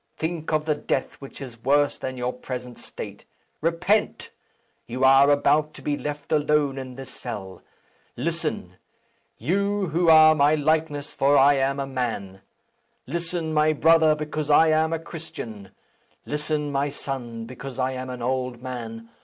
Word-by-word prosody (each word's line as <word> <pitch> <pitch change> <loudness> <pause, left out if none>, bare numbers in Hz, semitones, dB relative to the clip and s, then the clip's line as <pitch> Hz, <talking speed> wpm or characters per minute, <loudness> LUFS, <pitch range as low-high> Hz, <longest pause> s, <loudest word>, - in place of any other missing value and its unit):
Think 160 -1 -3
of 155 -1 +1
the 155 - +2
death 140 -2 -2
which 135 - -10
is 120 -4 -10
worse 145 +1 +3
than 130 0 -5
your 125 0 -2
present 125 -1 -7
state. - - -9 0.4
Repent! 170 +6 0 0.6
You 125 +3 -3
are 135 +1 +7
about 150 +1 +2
to - - -12
be 145 - 0
left 145 -1 -6
alone 150 -2 +2
in 130 -1 -8
this 135 0 -9
cell. 100 -6 -7 0.6
Listen! - - -3 0.6
you 200 - 0
who 170 +2 +2
are 155 0 +8
my 150 0 +4
likeness; 150 -1 0
for 140 +1 +3
I 140 +2 +6
am 135 +1 0
a 140 - -1
man! 115 -8 -4 0.6
Listen, 165 +2 -3
my 155 0 +3
brother, 160 0 +5
because 150 0 -4
I 160 +2 +6
am 160 +1 +2
a 165 - 0
Christian! 120 - -9 0.6
Listen, 150 0 -2
my 140 +1 0
son, 120 -5 -6
because 130 +2 -8
I 130 0 0
am 130 0 -5
an 125 -1 -6
old 125 -1 -2
man! 115 -3 -7
145 Hz, 155 wpm, -24 LUFS, 130-155 Hz, 0.6 s, are